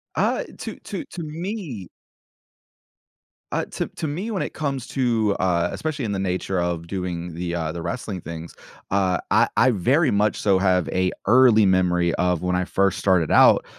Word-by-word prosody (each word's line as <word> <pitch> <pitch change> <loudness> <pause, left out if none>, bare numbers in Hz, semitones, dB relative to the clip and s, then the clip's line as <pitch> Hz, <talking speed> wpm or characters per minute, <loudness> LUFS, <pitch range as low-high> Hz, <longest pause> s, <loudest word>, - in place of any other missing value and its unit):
Uh, - - +1
i - - -14
to - - -6
to - - -5
to 175 - -7
me 160 - -5 1.6
uh, - - -1
to - - -4
to 160 - -5
me, 185 +10 -4
when 195 - -2
it - - -4
comes 135 -4 -3
to, 115 -6 +1
uh- 90 -2 +1
especially 150 -5 -3
in 105 - -2
the 95 - -2
nature 95 0 -1
of 85 -1 -2
doing 90 -3 -4
the, 85 0 -3
uh, 80 -2 -2
the 85 +1 -6
wrestling 95 0 -4
things- 85 0 -8 0.4
uh, 95 -2 +2
I - - +5
I 130 +2 +5
very 130 - +2
much 105 0 +1
so 100 -2 +3
have 90 -3 +2
a 90 0 +1 0.2
early 120 -3 +6
memory 90 -2 +2
of 90 -2 0
when 90 0 0
I 90 0 0
first 100 0 +1
started 90 -5 +2
out, - - +6
95 Hz, 185 wpm, -23 LUFS, 90-130 Hz, 1.6 s, early